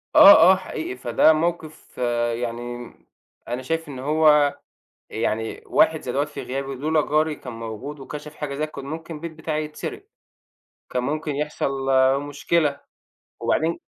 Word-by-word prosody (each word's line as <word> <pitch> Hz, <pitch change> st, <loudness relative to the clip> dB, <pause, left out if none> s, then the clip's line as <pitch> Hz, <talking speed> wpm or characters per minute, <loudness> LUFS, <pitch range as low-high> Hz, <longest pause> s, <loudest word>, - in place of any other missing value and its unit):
آه، 200 Hz, -, +11 dB, 0.2 s
آه، -, -, +6 dB
حقيقي. 160 Hz, -7 st, -5 dB
فده 125 Hz, +6 st, +4 dB
موقِف 160 Hz, -1 st, -3 dB, 0.4 s
يعني 120 Hz, +1 st, -4 dB
م 120 Hz, -, -12 dB, 0.4 s
أنا 125 Hz, +2 st, -3 dB
شايف 165 Hz, +4 st, -2 dB
إن 135 Hz, -3 st, -7 dB
هو 150 Hz, 0 st, +4 dB, 0.5 s
يعني 110 Hz, 0 st, -2 dB
واحد 185 Hz, -7 st, +3 dB
زي 125 Hz, -, -4 dB
دوّة 140 Hz, +3 st, +1 dB
في 150 Hz, -, -8 dB
غيابي، 135 Hz, +1 st, -4 dB
لولا 155 Hz, +3 st, +1 dB
جاري 155 Hz, 0 st, +2 dB
كان 125 Hz, -3 st, -9 dB
موجود 115 Hz, +6 st, -7 dB
وكشف 150 Hz, +3 st, -8 dB
حاجة 140 Hz, -2 st, -4 dB
زي 155 Hz, +2 st, -1 dB
ك -, -, -16 dB
كان 140 Hz, -1 st, -8 dB
ممكن 160 Hz, +2 st, -6 dB
البيت 165 Hz, +2 st, -6 dB
بتاعي 155 Hz, -1 st, -3 dB
يتسرِق. 150 Hz, -, -7 dB, 0.8 s
كان 125 Hz, -, -1 dB
ممكن 150 Hz, +1 st, -2 dB
يحصل 150 Hz, -1 st, -2 dB, 0.5 s
مشكلة 145 Hz, 0 st, 0 dB, 0.6 s
وبعدين 165 Hz, +1 st, 0 dB
150 Hz, 150 wpm, -23 LUFS, 130-155 Hz, 0.8 s, آه